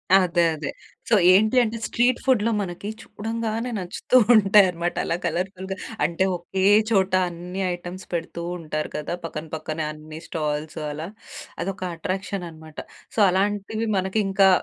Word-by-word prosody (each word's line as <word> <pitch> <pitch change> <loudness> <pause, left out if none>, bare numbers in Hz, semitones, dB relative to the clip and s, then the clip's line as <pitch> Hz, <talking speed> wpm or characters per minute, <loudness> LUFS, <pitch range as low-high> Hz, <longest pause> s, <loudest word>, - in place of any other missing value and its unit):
అదే 180 -2 +4
అదే. 150 -1 -4 0.4
సో - - +6 0.2
ఏంటి 215 +6 +4
అంటే, 230 0 -2
స్ట్రీట్ 245 +1 +2
ఫుడ్‌లో 230 -4 +3
మనకి 190 +2 -5
చూడంగానే 225 +2 -3
నచ్చుతూ 185 +7 +1 0.2
ఉంటాయన్నమాట. 190 -4 +4
అలా 165 - 0
కలర్‌ఫుల్‌గా, 190 +1 -2 0.3
అంటే 170 +3 0
ఓకే 185 +2 -3 0.3
చోట 190 -2 +3 0.2
అన్ని 175 +2 -6
ఐటెమ్స్ 175 +1 -7
పెడుతూ 170 0 -3 0.2
ఉంటారు 155 -1 -4
కదా! 150 +3 -3
పక్కన 160 -1 -5
పక్కనే 155 0 -3
అన్ని 155 +1 -10
స్టాల్స్ 150 -1 -3
అలా. 155 +3 -5 0.6
అదొక 190 0 -4
అట్రాక్షన్ 190 0 -3
అన్నమాట. 160 -1 -14 0.4
సో, - - -1
అలాంటివి 205 +4 0
మనకింకా 195 0 +3
185 Hz, 130 wpm, -24 LUFS, 165-205 Hz, 0.6 s, సో